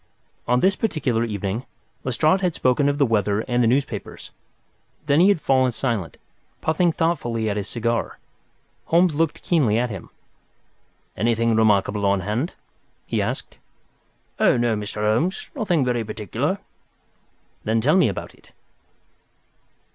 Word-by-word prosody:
On 125 +1 +2
this 195 +1 +3
particular 145 - 0
evening, 105 0 -3 0.4
Lestrade 155 +9 +2
had 180 -3 0
spoken 130 +3 +2
of 145 - -1
the 145 - +4
weather 105 -3 +1
and 120 +1 0
the 115 - +3
newspapers. 135 +4 -2 0.7
Then 145 +1 +3
he 185 +3 +6
had 200 - +3
fallen 130 -3 +2
silent, 115 -8 -3 0.4
puffing 165 +2 +2
thoughtfully 120 -10 -1
at - - -2
his 105 -1 -3
cigar. 115 0 -2 0.7
Holmes 170 0 +3
looked 160 +1 -1
keenly 135 -11 +2
at 120 0 0
him. 95 -4 -8 1.1
"Anything 115 +2 +1
remarkable 105 -1 +2
on 100 -1 +2
hand?" 110 - -2 0.5
he - - -1
asked. - - -4 0.8
"Oh, - - +4
no, 120 -2 +1
Mr. 105 0 -5
Holmes—nothing 165 - 0
very 120 -2 0
particular." 105 -3 -2 1.1
"Then 110 +1 +1
tell 145 +9 +3
me 185 - +5
about 95 - -6
it." - - -22
120 Hz, 135 wpm, -23 LUFS, 110-155 Hz, 1.1 s, he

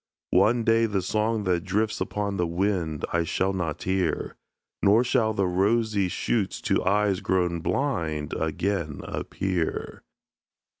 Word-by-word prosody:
One 110 +6 +4
day 115 0 +3
the 100 -3 -1
song 110 +3 0
that 90 -3 0
drifts 105 +3 -1
upon 100 -1 -2
the 90 - +1
wind, 85 -3 -1
I 85 0 +2
shall 95 +4 0
not 85 -5 -3
hear; 95 -1 -1 0.5
Nor 105 +4 +5
shall 120 -3 +2
the 100 -3 0
rosy 100 +2 +1
shoots 100 +2 -1
to - - +1
eyes 100 0 +2
grown 90 -2 0
blind 80 - -1
Again 80 -1 -2
appear. 90 -4 -3
95 Hz, 135 wpm, -26 LUFS, 85-105 Hz, 0.5 s, Nor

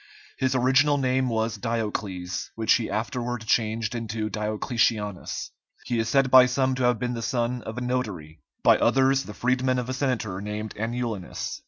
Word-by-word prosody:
His 130 0 0
original 135 +3 +4
name 130 -1 +1
was 110 -1 -1
Diocles, 105 -5 -3
which 110 -1 +3
he 115 - 0
afterward 120 +2 -3
changed 110 0 0
into 110 -2 -3
Diocletianus. 105 -2 -1 0.3
He 120 -2 -1
is 115 0 0
said 135 +1 +3
by 130 -1 +9
some 130 +1 +1
to 130 0 -2
have 125 -1 +3
been 125 +2 -2
the 115 - -4
son 120 +1 -1
of 110 +2 -7
a - - -3
notary, 100 - -3 0.2
by - - +6
others 135 +1 +3
the 105 - -9
freedman 130 +1 +1
of 125 0 -3
a - - -1
senator 120 -8 -2
named 105 +1 -5
Anulinus. 115 -3 -4
115 Hz, 170 wpm, -25 LUFS, 110-125 Hz, 0.3 s, by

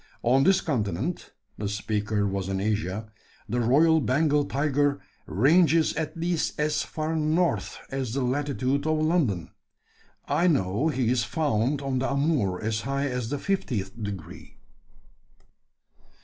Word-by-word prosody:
On 130 +3 +4
this 190 +3 +4
continent 120 - -2 0.3
(the 100 -1 -2
speaker 105 0 -1
was 95 -1 -2
in 95 0 -1
Asia) 105 +1 -2 0.4
the 120 +3 -1
royal 155 +7 +4
Bengal 145 +2 +2
tiger 145 +1 +1 0.3
ranges 160 - +4
at 160 +1 -4
least 170 -2 -1
as 150 0 +1
far 155 +1 -3
north 160 +1 0
as 130 -3 -3
the 135 - 0
latitude 140 +1 -1
of 155 0 +2
London. 155 - 0 0.8
I 175 - +2
know 115 - +1
he 130 -6 +1
is 125 -2 +2
found 140 -1 0
on 135 -2 -1
the 130 - -1
Amoor 140 - +1
as 110 0 -2
high 140 +2 -1
as 125 -3 -3
the 145 - -2
fiftieth 125 - -2
degree." 100 -5 -7
135 Hz, 135 wpm, -26 LUFS, 110-155 Hz, 0.8 s, On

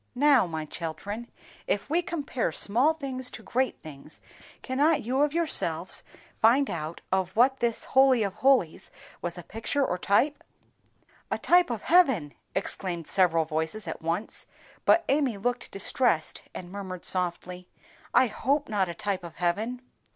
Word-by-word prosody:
Now, 275 -6 +5
my 160 -2 -4
children, 190 +9 -6 0.4
if 200 - -1
we 330 +5 +2
compare 290 - -2
small 245 - +2
things 260 -4 -3
to - - -10
great 260 +1 -1
things, 150 0 -11 0.4
cannot 285 +4 +2
you 255 +5 0
of 295 0 +3
yourselves 335 0 0 0.4
find 255 +5 +4
out 160 0 -5
of 190 -1 0
what 260 +4 +4
this 235 -1 0
Holy 265 -3 +4
of 200 -2 -2
holies 250 -8 +2 0.3
was 175 0 -4
a 175 - -8
picture 230 - -1
or 180 - -1
a - - -23
type?" 260 +11 +1 0.9
"A - - -1
type 355 -3 +4
of 230 -4 -4
heaven!" 265 - +3 0.2
exclaimed 180 -3 -3
several 165 -3 +2
voices 160 +7 -3
at - - -5
once; 170 +6 -2 0.4
but 340 - +4
Amy 275 -6 +1
looked 245 +4 -2
distressed, 195 -3 0
and 180 -1 -9
murmured 190 -3 -7
softly, 180 0 -1 0.4
"I - - +5
hope 275 +5 -1
not 195 -4 0
a 170 - -5
type 195 0 -2
of 170 -1 -9
heaven." 215 +8 -2
215 Hz, 155 wpm, -27 LUFS, 175-265 Hz, 0.9 s, Now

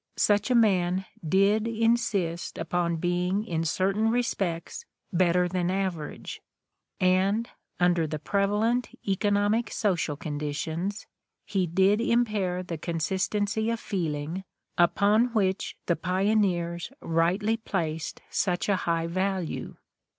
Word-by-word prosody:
Such 205 +2 +3
a 250 - +3
man 190 -4 +3 0.2
did 195 +6 +3
insist 225 -7 0
upon 170 +1 0
being 180 +4 0
in 165 -6 -1
certain 195 +6 +1
respects 200 - -1 0.3
better 180 0 +3
than 180 -1 -1
the 185 - 0
average; 180 -6 -4 0.6
and 190 +5 +2 0.3
under 175 -2 +3
the 155 0 -3
pre 200 +6 +1
valent 225 +5 +1 0.2
economic 205 +3 +1
social 175 -8 0
conditions 160 +5 -3 0.4
he 190 -3 0
did 190 +5 +3
impair 210 -7 +1
the 170 -3 -5
consistency 195 +6 -1
of 230 -1 -1
feeling 165 -3 -3 0.3
upon 210 +7 +3
which 190 -3 0
the 170 - +2
pioneers 180 -1 0
rightly 180 +7 +1
placed 165 -8 -3
such 180 -2 0
a 200 - +4
high 165 0 +1
value. 185 0 -2
185 Hz, 115 wpm, -27 LUFS, 170-210 Hz, 0.6 s, a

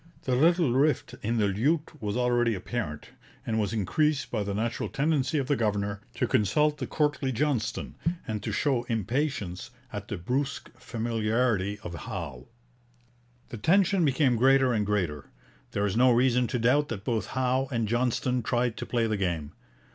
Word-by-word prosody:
The 130 - 0
little 165 -1 +4
rift 140 +1 +1
in 115 +2 -1
the 105 - +3
lute 145 - 0
was 105 +1 -2
already 120 -2 +2
apparent, 95 -6 -4 0.4
and 110 -1 0
was 105 -2 0
increased 145 - 0
by 110 - -1
the 100 -1 -2
natural 115 +3 -2
tendency 150 0 +1
of 140 - 0
the 145 +2 +1
governor 100 -3 -1
to - - +1
consult 150 +6 +2
the - - -3
courtly 145 -3 0
Johnston, 120 -4 -1 0.3
and 110 -2 -3
to - - -3
show 135 -5 +1
impatience 115 - -2 0.2
at 105 -1 -5
the 105 - -4
brusque 130 +10 -2
familiarity 110 -3 -1
of 85 - -6
Howe. 70 -5 -6 1.0
The 120 - -6
tension 185 - +3
became 135 -4 +3
greater 130 +1 +4
and 105 -3 0
greater. 85 -9 -1 0.4
There 100 - -1
is 100 - -1
no 125 +2 +5
reason 125 0 +3
to 125 - -1
doubt 130 +5 +2
that 105 -4 -5
both 110 -5 -1
Howe 130 +1 +1
and 115 -3 0
Johnston 125 +2 0
tried 120 0 0
to - - -5
play 120 -2 +1
the 110 -2 0
game. 85 -6 -2
120 Hz, 170 wpm, -28 LUFS, 105-135 Hz, 1.0 s, no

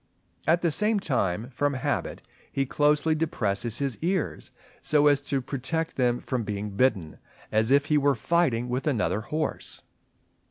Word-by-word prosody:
At 170 +2 +3
the 170 - +2
same 210 +5 +2
time 115 - -1
from 145 +2 0
habit 135 -1 -2 0.3
he 135 - 0
closely 150 +3 +2
depresses 120 -8 -1
his 135 -5 -2
ears, 180 0 -1 0.3
so 150 -1 +3
as 145 -1 +5
to 140 -1 -1
protect 140 +5 -3
them 120 -2 +1
from 130 -3 -2
being 105 -1 -4
bitten, 100 -7 0 0.3
as 110 +1 +2
if 140 +1 +4
he 150 0 +3
were 140 -1 +3
fighting 125 -2 +1
with 125 +4 -2
another 110 -6 0
horse. 155 +7 -4
135 Hz, 155 wpm, -26 LUFS, 120-150 Hz, 0.3 s, as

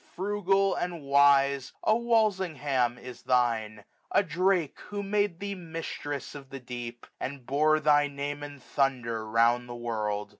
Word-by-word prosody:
Frugal, 195 0 +1
and 175 -3 -3
wise, 140 -1 +4
a 215 - +4
Walsingham 180 - +1
is 125 -1 -10
thine; 115 -4 0 0.3
A - - +4
Drake, 180 -2 0
who 205 -1 -4
made 200 -3 0
thee 200 0 -3
mistress 165 -5 -6
of 140 -2 -10
the 135 - -7
deep. 120 -1 -7
And 135 -2 -5
bore 155 +4 +3
thy 145 -1 +4
name 145 +1 -5
in 145 -1 -8
thunder 120 -5 -1
round 120 +2 +3
the 120 - -6
world. 105 -3 -3
140 Hz, 145 wpm, -28 LUFS, 120-180 Hz, 0.3 s, wise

